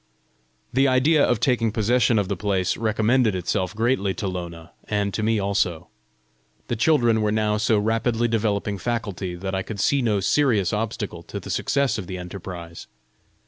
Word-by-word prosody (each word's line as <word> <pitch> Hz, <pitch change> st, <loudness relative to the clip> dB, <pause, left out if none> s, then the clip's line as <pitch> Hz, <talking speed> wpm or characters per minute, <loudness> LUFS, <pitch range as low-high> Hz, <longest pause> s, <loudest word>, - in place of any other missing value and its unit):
The 135 Hz, +2 st, +4 dB
idea 140 Hz, +4 st, +4 dB
of 120 Hz, -, +2 dB
taking 115 Hz, -3 st, +1 dB
possession 115 Hz, +2 st, +2 dB
of 100 Hz, -2 st, +1 dB
the 100 Hz, -, -2 dB
place, 95 Hz, -1 st, 0 dB
recommended 110 Hz, 0 st, +2 dB
itself 90 Hz, +2 st, -2 dB
greatly 110 Hz, -4 st, 0 dB
to 100 Hz, -, -3 dB
Lona 85 Hz, -2 st, -6 dB
and 105 Hz, -1 st, -1 dB
to -, -, -2 dB
me 110 Hz, +1 st, +1 dB
also. 100 Hz, -5 st, -1 dB, 0.8 s
The 120 Hz, -, 0 dB
children 120 Hz, -3 st, +3 dB
were 105 Hz, 0 st, +1 dB
now 105 Hz, 0 st, +1 dB
so 110 Hz, +1 st, +2 dB
rapidly 115 Hz, +2 st, +1 dB
developing 105 Hz, -3 st, -1 dB
faculty, 100 Hz, -6 st, -3 dB
that 95 Hz, +2 st, -5 dB
I 95 Hz, -, 0 dB
could 100 Hz, +1 st, -7 dB
see 140 Hz, +7 st, +2 dB
no 110 Hz, -4 st, +1 dB
serious 105 Hz, -, +2 dB
obstacle 110 Hz, +1 st, -3 dB
to -, -, -7 dB
the -, -, -7 dB
success 140 Hz, -5 st, 0 dB
of 95 Hz, -, -7 dB
the 95 Hz, -, -5 dB
enterprise. 90 Hz, -2 st, -8 dB
105 Hz, 170 wpm, -23 LUFS, 95-120 Hz, 0.8 s, The